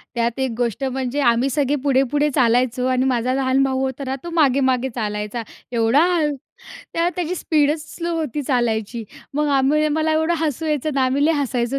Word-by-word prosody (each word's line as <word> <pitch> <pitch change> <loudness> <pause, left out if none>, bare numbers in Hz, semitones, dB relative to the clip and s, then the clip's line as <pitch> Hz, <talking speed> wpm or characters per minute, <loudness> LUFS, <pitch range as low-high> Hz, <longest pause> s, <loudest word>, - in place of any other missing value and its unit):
त्यात 235 +1 -1
एक 265 -1 0
गोष्ट 245 +2 -1
म्हणजे 265 +1 -2
आम्ही 240 0 +3
सगळे 285 +1 +1
पुढे-पुढे 280 +2 +2
चालायचो 250 0 +2
आणि 255 0 +1
माझा 255 0 +1
लहान 265 0 +2
भाऊ 265 -1 0
होता 265 +1 -3
ना, 265 +1 -2
तो 345 - -5
मागे-मागे 265 -4 +2
चालायचा 210 0 -3 0.3
एवढा 235 +6 +3
हळू. 300 -4 +1 0.6
त्या 335 +1 +1
त्याची 355 0 -2
स्पीडच 305 -3 +1
स्लो 340 0 -3
होती 300 -2 -2
चालायची. 235 -4 -1 0.3
मग 300 0 +1
आम्ही 300 +3 +2
मला 315 +1 +1
एवढं 320 +2 +1
हसू 315 0 -2
यायचं 305 -1 0
ना, 270 -1 +2
आम्ही 270 +3 +1
लय 325 - +3
हसायचो 270 -3 -1
265 Hz, 180 wpm, -21 LUFS, 245-300 Hz, 0.6 s, आम्ही